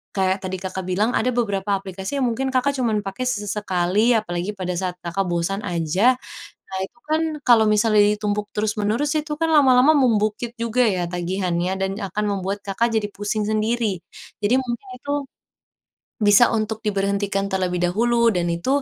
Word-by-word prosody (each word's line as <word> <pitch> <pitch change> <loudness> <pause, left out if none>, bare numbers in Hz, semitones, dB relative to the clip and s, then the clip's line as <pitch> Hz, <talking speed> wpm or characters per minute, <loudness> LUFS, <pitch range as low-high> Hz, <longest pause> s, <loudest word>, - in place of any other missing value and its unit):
kayak 190 0 0
tadi 190 0 -3
Kakak 190 0 -4
bilang, 205 +6 +1
ada 250 - +1
beberapa 200 -4 0
aplikasi 195 +7 -5
yang - - +2
mungkin 265 +3 -2
Kakak 260 +2 +2
cuman 225 -5 0
pakai 195 +6 -4
sesekali, 205 -1 +1
apalagi 180 -2 -3
pada 180 -1 -3
saat 180 0 -3
Kakak 175 +3 -1
bosan 175 +4 -1
aja. 180 +7 +2 0.5
Nah, 190 - -5
itu 315 - -20
kan 315 +1 +2 0.3
kalau 230 -2 +6
misalnya 215 0 +4 0.2
ditumpuk 210 0 -2
terus-menerus, 215 +7 0
itu 300 0 -4
kan 325 0 +1
lama-lama 270 0 +6
membukit 225 -2 +1
juga 235 +2 0
ya 185 -5 +1
tagihannya, 180 0 -1
dan 190 0 0
akan 205 +2 -2
membuat 195 +2 -3
Kakak 225 +4 0
jadi 210 - 0
pusing 205 +1 -2
sendiri. 215 -3 0 0.4
Jadi 215 +5 +3
mungkin 245 0 -5
itu, 285 +3 -4 1.1
bisa 205 +3 +6
untuk 220 0 -2
diberhentikan 200 -1 0
terlebih 185 -2 0
dahulu, 235 +6 +2
dan 175 -1 0
itu, 260 +12 0
210 Hz, 160 wpm, -22 LUFS, 190-235 Hz, 1.1 s, kalau